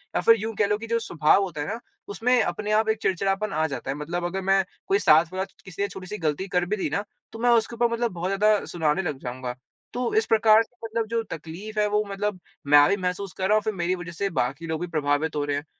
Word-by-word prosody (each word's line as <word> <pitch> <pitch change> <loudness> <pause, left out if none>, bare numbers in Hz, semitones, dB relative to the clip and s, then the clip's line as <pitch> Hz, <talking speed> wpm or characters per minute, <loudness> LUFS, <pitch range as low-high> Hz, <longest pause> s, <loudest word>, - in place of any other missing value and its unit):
या - - +2
फिर 230 - +7
यूँ 220 +2 -3
कह 205 - +2
लो 210 +1 +1
कि 230 +2 -8
जो 230 0 +1
स्वभाव 165 -4 +3
होता 175 -6 -4
है 145 - -3
ना 225 +3 -3 0.3
उसमें 245 +4 +2
अपने 205 +4 -2
आप 220 +1 +3
एक 220 - +2
चिड़चिड़ापन 195 +2 0
आ 155 +1 +1
जाता 135 -3 -6
है। - - -3
मतलब 175 +4 -3
अगर 190 +2 -2
मैं 195 0 +5 0.2
कोई 390 +1 +3
साथ 160 - +6
वाला 190 0 -1 0.2
किसी 185 +1 -7
ने 200 - +2
छोटी-सी 190 +1 -7
गलती 160 +2 -1
कर 180 -1 +1
भी 205 +4 -1
दी 190 - -1
ना 200 - -1 0.3
तो 225 - -9
मैं 245 +1 +2
उसके 230 0 +2
ऊपर 240 +1 +3
मतलब 235 0 0
बहुत 175 +1 -3
ज़्यादा 210 +1 +2
सुनाने 160 0 0
लग 155 -7 -3
जाऊँगा। 125 0 -5 0.4
तो 245 0 -2
इस 440 - +3
प्रकार 220 0 +5
से 245 - -25
मतलब 225 0 -2
जो 230 +1 0
तकलीफ़ 175 +7 -6
है 210 - +3
वो 210 - +2
मतलब 200 -1 -2 0.3
मैं 145 0 +7
भी 200 - +2
महसूस 180 0 -3
कर 190 - 0
रहा 210 - +4
हूँ 215 - +3
फिर 220 0 -1
मेरी 180 -1 -1
वज़ह 175 -1 -7
से 195 +4 -2
बाकी 140 +7 -3
लोग 160 0 -3
भी 175 - -2
प्रभावित 150 -1 0
हो 145 - 0
रहे 145 -1 -1
हैं। 145 - -5
195 Hz, 265 wpm, -25 LUFS, 160-215 Hz, 0.4 s, फिर